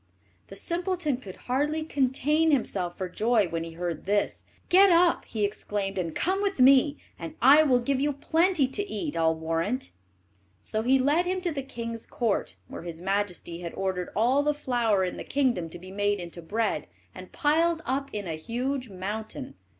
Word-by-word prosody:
The - - -10
simpleton 345 -5 -1
could 200 -8 -10
hardly 295 +5 0
contain 295 +2 +1
himself 190 - 0
for 185 - -3
joy 215 +2 +2
when 165 0 -2
he 165 0 -8
heard 170 -1 -4
this. 205 0 0 0.2
"Get 390 +2 +7
up," 340 0 +4
he 215 -2 -1
exclaimed, 200 -1 -3
"and 165 -3 -3
come 380 +3 0
with 400 -6 -1
me, 270 +3 +6 0.2
and 165 -1 -7
I 275 +5 +7
will 270 -5 +4
give 265 +2 0
you 290 +1 +2
plenty 320 +2 +2
to 405 +9 -4
eat, 310 -4 -3
I'll 160 0 +2
warrant." 165 +10 -2 0.7
So 215 - -2
he 255 +4 +4
led 295 +7 +2
him 370 +1 0
to 355 -2 -1
the 285 -3 -3
king's 230 -3 -6
court, 215 - -1
where - - -8
his 170 -1 -7
majesty 185 -2 -2
had 170 -1 -6
ordered 185 -2 -2
all 245 +6 +3
the 295 0 +1
flour 240 -8 +1
in 180 - -3
the - - -5
kingdom 250 -12 0
to 170 - -9
be 185 +2 -11
made 205 +1 0
into 175 0 -8
bread, 205 -2 -1 0.3
and 185 0 -11
piled 325 +2 +2
up 275 +2 -1
in 205 -1 -4
a 165 - -3
huge 245 - -3
mountain. 200 -4 -5
240 Hz, 185 wpm, -27 LUFS, 185-290 Hz, 0.7 s, Get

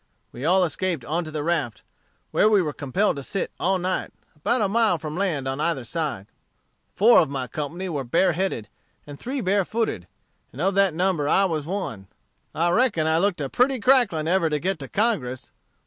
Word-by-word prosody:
We 125 +4 -7
all 185 +3 +4
escaped 175 -5 -2
on 165 +6 -1
to - - -7
the 155 -1 -4
raft, 145 -10 -1 0.5
where 215 - +4
we 210 -2 +5
were 150 -3 -3
compelled 155 +6 0
to - - -4
sit 195 +8 -3
all 190 +2 +1
night, 185 +1 -2 0.2
about 215 +10 0
a - - +2
mile 215 -3 +2
from 155 -1 -6
land 170 -8 -1
on 135 +2 -2
either 155 -6 0
side. 135 - -3 0.7
Four 230 +4 +6
of 160 - +2
my 135 -2 -3
company 155 +8 -5
were 150 -6 -3
bareheaded, 170 - 0 0.4
and 145 -1 -10
three 265 +2 -3
barefooted; 195 - 0 0.4
and 125 - -12
of 190 +4 +1
that 195 -4 +3
number 175 -5 +1
I 195 - +4
was 155 -5 -2
one. 165 - -4 0.5
I 170 +2 +2
reckon 195 -6 +2
I 160 +1 +2
looked 190 -3 0
like - - -1
a - - -5
pretty 255 +1 +2
cracklin 235 - +3
ever 170 -1 +2
to 150 - 0
get 180 +3 -2
to 135 - -7
Congress! 145 - -1
170 Hz, 195 wpm, -24 LUFS, 145-195 Hz, 0.7 s, Four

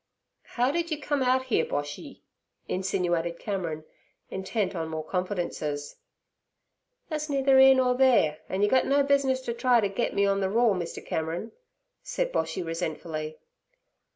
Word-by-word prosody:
'How 250 +2 0
did 340 +2 -1
you 310 -2 -2
come 290 -2 -1
out 260 0 +2
here, 240 -10 +1
Boshy?' 145 0 -5 0.4
insinuated 175 -2 -1
Cameron, 170 -7 -4 0.5
intent 190 +2 -2
on 165 -2 -2
more 160 -1 -4
confidences. 175 -6 -3 1.1
'That's 305 -1 -3
neither 270 -1 +4
'ere 265 0 +8
nur 250 -1 +2
theere, 245 - +4
an' 190 +2 0
yer - - +5
gut 260 - +3
no 280 +1 +3
business 275 -2 +2
ter 235 - -2
try 245 0 +3
t' 205 -3 +1
git 220 +5 -2
me 200 - +3
on 200 0 +1
ther 190 - 0
raw, 235 +3 +3
Mr. 175 -3 -5
Cameron' 165 +7 -3 0.5
said - - -2
Boshy 185 - -1
resentfully. 160 -2 -4
200 Hz, 155 wpm, -27 LUFS, 170-260 Hz, 1.1 s, ere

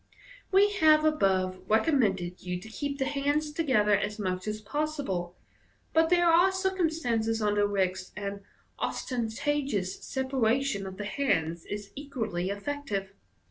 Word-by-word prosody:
We 400 +2 +5
have 310 -2 +5
above 190 -11 +2
recommended 210 - +1
you 180 -1 -3
to 185 - -11
keep 280 +5 -4
the 265 - 0
hands 290 +2 0
together 255 -10 +2
as 205 +1 -2
much 185 -2 -3
as 215 0 -2
possible 215 - -3
j - - -35 0.5
but 325 0 +4
there 350 0 +4
are 345 +3 +5
circumstances 320 - 0
under 205 -1 +2
which 185 -2 0
an 200 -1 -4 0.4
ostentatious 240 -4 -2
sepa 265 0 -3
ration 225 -3 +1
of 190 0 -8
the 205 - -4
hands 170 - 0
is 205 -1 -6
equally 220 -11 -3
effective. 200 -3 -3
220 Hz, 140 wpm, -29 LUFS, 195-290 Hz, 0.5 s, We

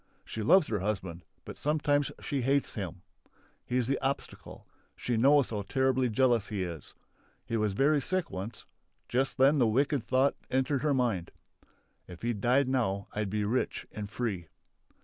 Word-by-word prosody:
She 110 - -5
loves 160 - +5
her 105 - 0
husband, 90 -4 -3 0.2
but - - -9
sometimes 145 -1 +1
she 140 -2 -2
hates 140 +3 +1
him. 95 -4 -6 0.6
He's 125 -1 0
the 135 +2 0
obstacle. 135 +1 -4 0.3
She 120 - -2
knows 140 +3 +4
how 105 -2 -2
terribly 130 +3 +1
jealous 120 -2 +2
he 100 -4 -2
is. 85 -3 -7 0.5
He 115 - -3
was 105 -3 +1
very 145 +7 +3
sick 185 +1 -2
once; 95 +5 -6 0.4
just 135 +3 0
then 140 +3 +5
the 120 - +4
wicked 135 +3 +1
thought 130 +3 +2 0.2
entered 130 +1 +1
her 150 -2 +2
mind: 115 -9 0 0.8
"If 90 +1 -11
he 120 0 +1
died 125 +6 +2
now 105 -7 -1
I'd 105 -1 -2
be 105 +1 -1
rich 120 +5 -1
and 105 -1 -6
free!" 100 -8 -3
120 Hz, 165 wpm, -30 LUFS, 105-135 Hz, 0.8 s, loves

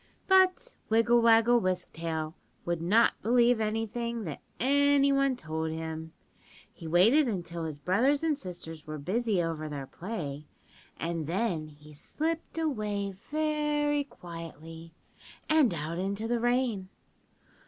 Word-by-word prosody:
"But 380 +5 +4 0.2
Wiggle 230 +2 +4
Waggle 230 +1 +5
Wisk 185 -3 -1
Tail 160 -1 -3 0.3
would 170 -1 -1
not 210 +7 +3
believe 240 +1 +4
anything 225 +2 -2
that 155 -7 -6 0.2
any 280 +1 +4
one 275 -1 +2
told 160 -4 -3
him. 160 0 -5 0.6
He 165 - -9
waited 220 - +5
until 170 -6 -3
his 155 -2 -5
brothers 245 - +2
and 320 -2 +2
sisters 165 - -7
were 155 0 -5
busy 195 +4 0
over 155 -2 -3
their 140 -2 -5
play, 155 - -6 0.5
and 165 -2 -3
then 175 -3 -1
he 150 0 -15
slipped 320 - -3
away 210 -10 -1
very 295 +5 0
quietly, 165 - -10 0.5
and 310 -6 +4
out 165 +1 -3
into 200 +4 -2
the 240 0 0
rain. 240 -5 0
200 Hz, 130 wpm, -29 LUFS, 165-250 Hz, 0.6 s, Waggle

